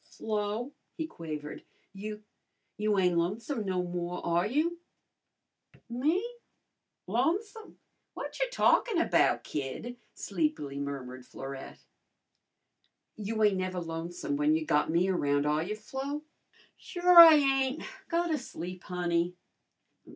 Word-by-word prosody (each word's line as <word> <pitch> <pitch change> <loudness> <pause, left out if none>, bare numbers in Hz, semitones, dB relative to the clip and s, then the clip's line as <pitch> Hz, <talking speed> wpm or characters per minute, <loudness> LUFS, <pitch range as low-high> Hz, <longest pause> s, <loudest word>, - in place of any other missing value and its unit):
"Flo," 215 +4 -3 0.3
he 320 - -2
quavered, 155 - -7 0.3
"you 210 +2 -7 0.5
you 210 -1 +1
ain't 180 -2 +3
lonesome 220 - -2
no 185 -2 -1
more, 175 0 -4
are 170 +3 +2
you?" 320 +8 0 1.1
"Me? 310 - +1 0.8
Lonesome? 425 +5 -1 0.4
Whatcher - - -2
talkin' 465 -5 +3
about, 335 - +3
kid?" 150 - -5 0.2
sleepily 195 - -2
murmured 130 -3 -5
Florette. 135 0 -8 1.3
"You 215 +1 -2
ain't 205 -2 +4
never 185 -1 -2
lonesome 165 -3 -4
when 150 +1 +3
you 160 0 -1
got 150 0 +2
me 170 +3 +2
around, 145 -6 +1
are 150 +1 +2
you, 200 +6 -3
Flo?" 270 +7 -5 0.5
"Sure 355 -1 +5
I 330 -2 +12
ain't. 270 -1 +2 0.2
Go 345 +1 +1
to 315 -3 0
sleep, 180 -6 -7
honey." 175 -1 -1
195 Hz, 115 wpm, -30 LUFS, 170-275 Hz, 1.3 s, I